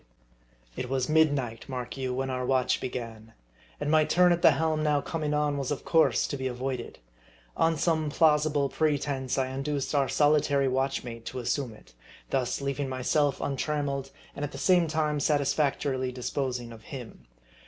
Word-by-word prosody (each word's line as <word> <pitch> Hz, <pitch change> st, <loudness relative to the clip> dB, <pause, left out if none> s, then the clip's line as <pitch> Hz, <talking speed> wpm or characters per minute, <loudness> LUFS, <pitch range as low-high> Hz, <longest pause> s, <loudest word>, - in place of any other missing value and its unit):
It 125 Hz, -, -4 dB
was 130 Hz, -1 st, 0 dB
midnight, 145 Hz, -8 st, +1 dB
mark 125 Hz, -2 st, -5 dB
you, 130 Hz, -1 st, -3 dB
when 130 Hz, +1 st, -2 dB
our 125 Hz, 0 st, -2 dB
watch 130 Hz, 0 st, +1 dB
began; 115 Hz, -3 st, -6 dB, 0.5 s
and 145 Hz, 0 st, -1 dB
my 155 Hz, -1 st, +5 dB
turn 180 Hz, +3 st, +4 dB
at 175 Hz, 0 st, +1 dB
the -, -, +7 dB
helm 160 Hz, -1 st, 0 dB
now 150 Hz, -1 st, +2 dB
coming 155 Hz, 0 st, -3 dB
on 150 Hz, -1 st, +1 dB
was 135 Hz, -, -2 dB
of 145 Hz, -, -3 dB
course 165 Hz, -1 st, +3 dB
to 140 Hz, -, -3 dB
be 130 Hz, 0 st, -2 dB
avoided. 125 Hz, 0 st, -4 dB, 0.6 s
On 165 Hz, 0 st, +2 dB
some 160 Hz, -1 st, +1 dB
plausible 150 Hz, -2 st, +3 dB
pretense, 140 Hz, -3 st, -1 dB
I 130 Hz, -1 st, 0 dB
induced 135 Hz, +1 st, -2 dB
our 140 Hz, -2 st, +2 dB
solitary 145 Hz, -2 st, +3 dB
watchmate 130 Hz, -3 st, -2 dB
to 130 Hz, -, -5 dB
assume 125 Hz, 0 st, -2 dB
it; -, -, -19 dB, 0.4 s
thus 130 Hz, 0 st, 0 dB
leaving 140 Hz, 0 st, -2 dB
myself 135 Hz, +3 st, +1 dB
untrammeled, 140 Hz, -1 st, -2 dB, 0.3 s
and 145 Hz, -, -5 dB
at 145 Hz, -, -3 dB
the -, -, -6 dB
same 180 Hz, -3 st, +3 dB
time 155 Hz, -1 st, 0 dB
satisfactorily 140 Hz, -3 st, +1 dB
disposing 125 Hz, -1 st, -3 dB
of 115 Hz, -1 st, -11 dB
him. 115 Hz, -, -10 dB
140 Hz, 165 wpm, -28 LUFS, 130-150 Hz, 0.6 s, the